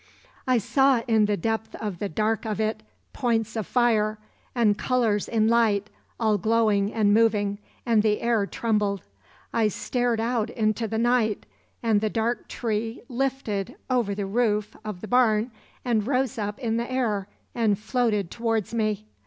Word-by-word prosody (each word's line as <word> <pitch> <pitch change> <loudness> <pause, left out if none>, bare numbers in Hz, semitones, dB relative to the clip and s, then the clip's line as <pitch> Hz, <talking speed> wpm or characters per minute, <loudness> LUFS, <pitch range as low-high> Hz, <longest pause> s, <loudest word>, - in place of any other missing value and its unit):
"I 255 -1 +4
saw 270 +2 +3
in 220 -2 +4
the 205 -1 0
depth 220 +4 -2
of 205 -6 -5
the 205 - -2
dark 215 +6 0
of 215 -2 -3
it 215 0 -1 0.3
points 225 -4 0
of 220 -3 -3
fire, 220 -3 +2 0.4
and 220 -4 +3
colors 225 -3 +1
in 220 -1 +2
light, 220 -3 +2 0.3
all 215 -3 +2
glowing 215 -2 +2
and 210 -3 +2
moving, 210 -2 +2 0.3
and 230 -3 +4
the 210 -1 +1
air 230 -4 +1
trembled. 210 -4 -1 0.5
I 225 -2 +3
stared 240 +3 -1
out 230 -1 0
into 220 0 0
the 220 - -3
night, 235 -2 +1 0.4
and 220 -3 +3
the 215 - +1
dark 230 +2 -1
tree 225 0 -3
lifted 250 -6 -2 0.2
over 235 -6 +1
the 200 -1 -2
roof 210 0 0
of 210 -4 -6
the 215 - -6
barn 240 -1 +3 0.3
and 225 -3 +1
rose 255 -3 0
up 205 0 -3
in 230 -4 -1
the 235 +2 -3
air 215 -7 0 0.3
and 220 -4 +2
floated 215 -4 0
towards 225 -2 -1
me. 215 -2 -1
220 Hz, 160 wpm, -25 LUFS, 210-235 Hz, 0.5 s, I